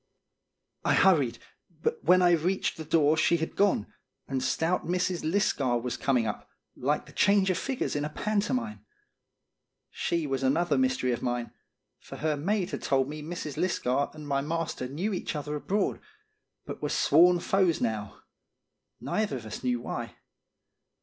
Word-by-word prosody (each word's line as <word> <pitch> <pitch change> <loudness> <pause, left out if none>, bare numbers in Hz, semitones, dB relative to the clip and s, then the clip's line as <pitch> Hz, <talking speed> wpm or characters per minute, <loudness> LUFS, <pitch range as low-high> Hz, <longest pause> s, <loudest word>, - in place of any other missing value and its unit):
I - - +3
hurried, 145 -11 +4 0.5
but - - -1
when 180 +2 +5
I 175 - +5
reached 175 +3 +1
the 160 - -6
door 155 -1 +3
she 165 +2 +3
had 160 0 -4
gone, 200 - +2 0.4
and 135 -1 -2
stout 160 +7 0
Mrs. 180 0 -1
Lisgar 155 - +1
was 125 +1 -3
coming 125 -4 +1
up, 105 - -5 0.3
like - - -1
the - - -14
change 200 -1 +3
of 180 - -1
figures 265 - -2
in 145 - 0
a 150 - -2
pantomime. 215 +6 -2 1.1
She 170 -2 -1
was 135 -2 -2
another 150 +4 +2
mystery 130 -1 +1
of 120 - -2
mine; 120 -1 -2 0.5
for - - -11
her 155 0 0
maid 185 +5 -1
had - - -4
told 135 0 +1
me 150 0 -6
Mrs. 155 -2 -6
Lisgar 140 -6 0
and 150 -1 -9
my 140 -1 +1
master 160 -3 -3
knew 175 +11 -2
each 180 - -3
other 150 0 -3
abroad, 195 +7 -1 0.7
but - - -7
were - - -1
sworn 175 +4 +5
foes 185 -2 +2
now, 110 -3 -3 0.8
neither 210 -10 -1
of 115 - -9
us 110 - -7
knew 125 -1 +1
why. - - -5
155 Hz, 165 wpm, -28 LUFS, 135-180 Hz, 1.1 s, when